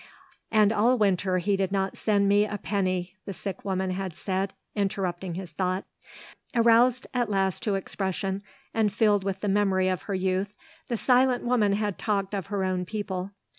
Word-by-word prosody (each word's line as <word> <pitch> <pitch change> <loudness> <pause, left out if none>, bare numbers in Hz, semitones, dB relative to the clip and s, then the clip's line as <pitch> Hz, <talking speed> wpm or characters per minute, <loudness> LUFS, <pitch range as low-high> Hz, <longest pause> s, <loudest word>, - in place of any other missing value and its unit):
"And 215 -1 +4
all 235 +4 +3
winter 190 -3 +2
he 195 +3 +1
did 190 -1 -1
not 195 -1 0
send 205 -2 +2
me 205 +1 +5
a 210 - -4
penny," 185 -2 -2
the 195 - -5
sick 195 +1 -6
woman 190 -1 -1
had 185 -1 -3
said, 190 +2 -2 0.2
interrupting 190 -3 -2
his 180 -2 -6
thoughts. 185 +3 -1 0.7
Aroused 235 +2 +4
at 245 -3 0
last 195 -2 0
to 205 -3 0
expression, 195 0 -2 0.3
and 220 -2 +2
filled 205 -2 +3
with 195 0 -3
the 210 - -1
memory 195 -2 +2
of 185 -4 -1
her 200 - 0
youth, 190 +2 -1 0.3
the 235 - -1
silent 250 +1 +3
woman 230 -5 +2
had 205 -1 -1
talked 200 -2 -1
of 195 -3 -3
her 200 -1 -1
own 185 -1 0
people. 190 -1 -4
195 Hz, 175 wpm, -27 LUFS, 190-210 Hz, 0.7 s, me